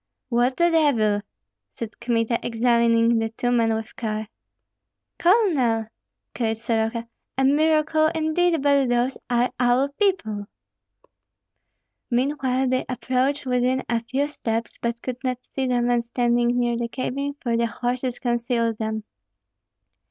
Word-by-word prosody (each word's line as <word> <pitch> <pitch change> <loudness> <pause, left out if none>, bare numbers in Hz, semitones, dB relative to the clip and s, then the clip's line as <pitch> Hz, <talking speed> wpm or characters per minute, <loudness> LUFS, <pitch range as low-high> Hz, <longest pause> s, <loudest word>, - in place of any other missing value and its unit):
"What 245 +1 +1
the 345 0 +3
devil!" 230 -11 +3 0.5
said 230 -2 -7
Kmita, 235 -1 0
examining 235 0 +3
the 225 0 -1
two 245 +2 -2
men 230 -2 +2
with 220 +1 -6
care. 215 -2 -3 0.9
"Colonel!" 290 - +3 0.4
cried 225 -2 -1
Soroka, 230 0 -1 0.3
"a 270 - +2
miracle 310 +2 +3
indeed, 320 0 +1
but 280 -3 +3
those 245 +2 +1
are 245 0 +2
our 250 +3 +3
people." 280 - -1 1.6
Meanwhile 260 0 0
they 255 0 +1
approached 260 +3 0
within 255 +1 +1
a 235 -1 +1
few 260 +5 -1
steps, 230 -6 -4
but 235 0 -2
could 255 +1 -5
not 255 -1 -1 0.2
see 265 -1 -1
the 245 -1 +1
men 240 0 +2
standing 240 0 +1
near 240 -1 +1
the 235 0 -2
cabin, 275 +3 -3
for 235 -3 -1
the 235 0 +1
horses 245 +1 -2
concealed 235 -2 -1
them. 220 -1 -2
245 Hz, 130 wpm, -24 LUFS, 230-270 Hz, 1.6 s, the